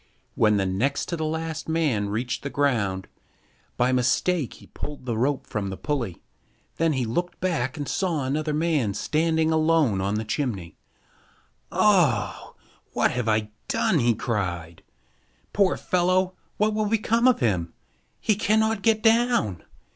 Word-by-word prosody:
When 105 Hz, -1 st, +3 dB
the 95 Hz, -, +1 dB
next 115 Hz, +10 st, -1 dB
to 170 Hz, -, -1 dB
the 160 Hz, -1 st, -2 dB
last 160 Hz, 0 st, -3 dB
man 145 Hz, -11 st, +1 dB
reached 115 Hz, +3 st, -2 dB
the 140 Hz, -, -4 dB
ground, 110 Hz, -10 st, 0 dB, 0.7 s
by 125 Hz, +1 st, +2 dB
mistake 130 Hz, +5 st, +1 dB
he -, -, -15 dB
pulled 145 Hz, -3 st, -8 dB
the 120 Hz, -3 st, -1 dB
rope 130 Hz, +5 st, 0 dB
from 100 Hz, -2 st, -3 dB
the 95 Hz, -, -5 dB
pulley. 125 Hz, -, -3 dB, 0.5 s
Then 165 Hz, -1 st, +2 dB
he 130 Hz, -3 st, 0 dB
looked 175 Hz, +11 st, -3 dB
back 160 Hz, -7 st, -1 dB
and 145 Hz, -2 st, -4 dB
saw 165 Hz, -1 st, -1 dB
another 150 Hz, +3 st, -1 dB
man 150 Hz, -9 st, 0 dB
standing 160 Hz, 0 st, +1 dB
alone 155 Hz, -10 st, +2 dB
on 100 Hz, +2 st, -1 dB
the 110 Hz, +1 st, -2 dB
chimney. 105 Hz, -, -3 dB, 1.0 s
"Oh! 170 Hz, -, +2 dB, 0.4 s
what -, -, +2 dB
have 125 Hz, -2 st, -2 dB
I 110 Hz, -1 st, 0 dB, 0.2 s
done!" 165 Hz, -, +2 dB
he 120 Hz, -2 st, +3 dB
cried. 90 Hz, -8 st, -3 dB, 0.7 s
"Poor 195 Hz, -2 st, +3 dB
fellow, 185 Hz, +1 st, +1 dB, 0.2 s
what 215 Hz, +1 st, +2 dB
will 215 Hz, 0 st, 0 dB
become 230 Hz, +3 st, +2 dB
of 255 Hz, -, +4 dB
him? 90 Hz, -8 st, 0 dB, 0.5 s
He 215 Hz, -, +2 dB
cannot 220 Hz, +1 st, +1 dB
get 220 Hz, 0 st, +2 dB
down! 225 Hz, -, +2 dB
145 Hz, 150 wpm, -25 LUFS, 110-175 Hz, 1.0 s, of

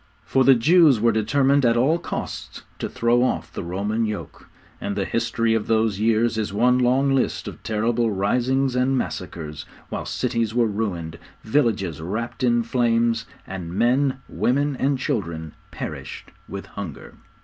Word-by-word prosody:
For 135 Hz, -, +3 dB
the 135 Hz, 0 st, +7 dB
Jews 150 Hz, +1 st, +5 dB
were 115 Hz, +2 st, +4 dB
determined 135 Hz, +6 st, +2 dB
at 120 Hz, -1 st, +3 dB
all 150 Hz, +8 st, +3 dB
costs -, -, -6 dB, 0.2 s
to -, -, -3 dB
throw 120 Hz, +1 st, +2 dB
off 130 Hz, -, -1 dB
the -, -, -4 dB
Roman 100 Hz, +6 st, -2 dB
yoke, 105 Hz, -1 st, -7 dB, 0.3 s
and 100 Hz, -, -3 dB
the 100 Hz, -1 st, -1 dB
history 115 Hz, 0 st, 0 dB
of 110 Hz, -2 st, -1 dB
those 110 Hz, -3 st, +1 dB
years 115 Hz, +1 st, +2 dB
is 105 Hz, -2 st, -2 dB
one 125 Hz, +5 st, +3 dB
long 130 Hz, +2 st, +3 dB
list 135 Hz, -, 0 dB
of -, -, -8 dB
terrible 115 Hz, +2 st, 0 dB
risings 125 Hz, +6 st, +1 dB
and 130 Hz, +1 st, +2 dB
massacres, 75 Hz, -, -5 dB, 0.3 s
while -, -, -4 dB
cities 115 Hz, -1 st, -1 dB
were 120 Hz, -1 st, +4 dB
ruined, 95 Hz, -7 st, -3 dB, 0.2 s
villages 110 Hz, -, 0 dB
wrapped 110 Hz, +9 st, -4 dB
in 120 Hz, -1 st, +3 dB
flames, 115 Hz, -1 st, +1 dB, 0.2 s
and 90 Hz, -2 st, -6 dB
men, 130 Hz, +4 st, +2 dB
women 140 Hz, +3 st, 0 dB
and 135 Hz, +1 st, +1 dB
children 85 Hz, -10 st, -3 dB, 0.2 s
perished -, -, -7 dB, 0.2 s
with 100 Hz, 0 st, -6 dB
hunger. 90 Hz, -8 st, -8 dB
115 Hz, 155 wpm, -23 LUFS, 105-125 Hz, 0.3 s, the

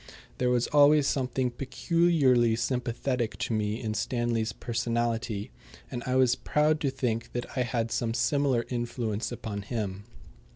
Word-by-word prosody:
There 125 Hz, -, +2 dB
was 125 Hz, -1 st, +2 dB
always 145 Hz, 0 st, +5 dB
something 130 Hz, -1 st, 0 dB
peculiarly 135 Hz, -4 st, +2 dB
sympathetic 125 Hz, 0 st, -1 dB
to -, -, -2 dB
me 105 Hz, +1 st, -1 dB
in 110 Hz, -2 st, -3 dB
Stanley's 115 Hz, -1 st, -1 dB
personality; 115 Hz, -, -2 dB, 0.4 s
and 120 Hz, -, -4 dB
I 130 Hz, -, +1 dB
was 130 Hz, -2 st, +5 dB
proud 150 Hz, +3 st, +1 dB
to 140 Hz, -, 0 dB
think 115 Hz, -3 st, -2 dB
that 120 Hz, 0 st, -2 dB
I 130 Hz, -, +1 dB
had 115 Hz, -2 st, -1 dB
some 115 Hz, -1 st, -1 dB
similar 140 Hz, -4 st, +1 dB
influence 120 Hz, -3 st, -2 dB
upon 110 Hz, -4 st, -5 dB
him. 100 Hz, -2 st, -4 dB
120 Hz, 140 wpm, -28 LUFS, 115-130 Hz, 0.4 s, always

